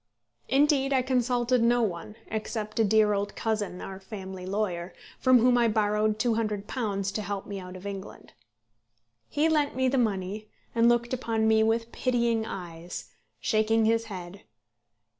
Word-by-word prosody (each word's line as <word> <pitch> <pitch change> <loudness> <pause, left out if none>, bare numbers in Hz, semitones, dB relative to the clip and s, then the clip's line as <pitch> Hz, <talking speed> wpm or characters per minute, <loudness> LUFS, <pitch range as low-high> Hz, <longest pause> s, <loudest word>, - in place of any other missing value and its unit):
Indeed, 275 +1 +3
I 260 -1 +3
consulted 250 -1 +1
no 240 +1 +3
one, 200 +1 -3
except 215 0 -4
a - - +5
dear 215 0 +4
old 200 0 -2
cousin, 210 -5 -2
our 190 0 -7
family 190 -2 -8
lawyer, 185 -3 -2 0.2
from 255 -1 +6
whom 245 +1 +4
I 235 - +4
borrowed 210 0 +1
£200 215 -2 -1
to 215 - -2
help 200 -1 -4
me 200 -1 -5
out 180 0 -9
of 185 +1 -10
England. 200 -1 -8 1.0
He 300 +2 +2
lent 300 -4 +1
me 260 0 +2
the 260 +1 +2
money, 210 -1 -2 0.2
and 230 0 +4
looked 240 +1 +1
upon 225 -3 0
me 220 0 +4
with 230 +1 +1
pitying 235 -3 0
eyes, 175 -2 -7 0.3
shaking 220 0 +2
his 225 +1 +2
head. 185 -2 -8
220 Hz, 155 wpm, -28 LUFS, 200-240 Hz, 1.0 s, from